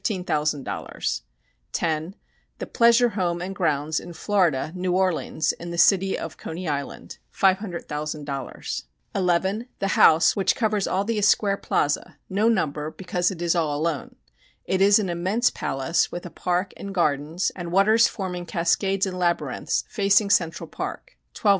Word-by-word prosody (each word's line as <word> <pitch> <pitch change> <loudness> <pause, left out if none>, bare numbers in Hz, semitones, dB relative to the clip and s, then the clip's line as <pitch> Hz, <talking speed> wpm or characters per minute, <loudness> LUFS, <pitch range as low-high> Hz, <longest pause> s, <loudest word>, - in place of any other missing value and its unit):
00 190 -6 -2 1.5
10 160 +3 -1 0.4
The - - -5
pleasure 235 +1 +4
home 180 -5 -1
and 185 +2 -5
grounds 155 -3 0
in 175 - -10
Florida 165 -6 +1
(New 180 0 -1
Orleans) 180 -4 +1
in 170 - -9
the 170 - -5
city 190 +2 +4
of 165 - -7
Coney 175 +2 -6
Island 140 -2 -5
500,000.00 155 - -2 0.3
11 190 +5 0
The 195 - -1
house 165 -2 +5
which 190 -2 +2
covers 215 -4 0
all 190 +2 0
the 220 +1 -1
Esquare 200 -1 +2
Plaza 145 0 -1
(no 210 +4 +2
number 155 -8 0
because 180 +1 -1
it 175 -3 -5
is 170 - +2
all 155 -4 0
alone). 155 -2 -2 0.5
It 190 0 0
is 200 +1 +6
an 210 -3 0
immense 185 +8 +1
palace, 135 +6 -1
with 175 - -6
a 175 - -7
park 180 +1 -1
and 200 -1 -7
gardens, 155 +1 0
and 175 -2 -6
waters 215 +5 +5
forming 180 -4 -5
cascades 190 +4 +1
and 185 -1 -4
labyrinths, 175 -1 0
facing 200 -1 +2
Central 170 -6 +1
Park - - -6 0.2
12,000,000. - - +1
180 Hz, 150 wpm, -24 LUFS, 165-195 Hz, 1.5 s, is